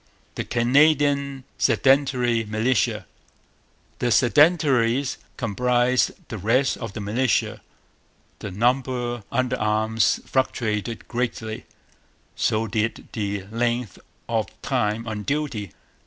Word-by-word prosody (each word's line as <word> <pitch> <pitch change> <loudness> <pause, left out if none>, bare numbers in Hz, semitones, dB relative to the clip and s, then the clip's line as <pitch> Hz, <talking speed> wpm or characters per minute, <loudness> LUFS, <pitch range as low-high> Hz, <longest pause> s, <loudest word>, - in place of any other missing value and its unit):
The - - -3
Canadian 140 +2 +2 0.2
Sedentary 130 -4 +3
Militia. 110 +2 0 0.9
The 125 - +1
'Sedentaries' 135 -2 +3 0.2
comprised 125 +3 +1 0.2
the 110 - -5
rest 125 +8 +2
of 115 -5 -6
the 110 - -6
militia. 110 +4 0 0.8
The - - -6
number 120 +3 0
under 130 0 0
arms 110 +1 +1
fluctuated 115 -4 -1
greatly; 120 -2 -3 0.7
so 110 +1 +1
did 110 +1 -2
the 100 -3 -3
length 120 -2 -1 0.3
of - - 0 0.2
time 105 +2 0
on 105 -1 -4
duty. 130 - -3
120 Hz, 95 wpm, -23 LUFS, 110-130 Hz, 0.9 s, Sedentary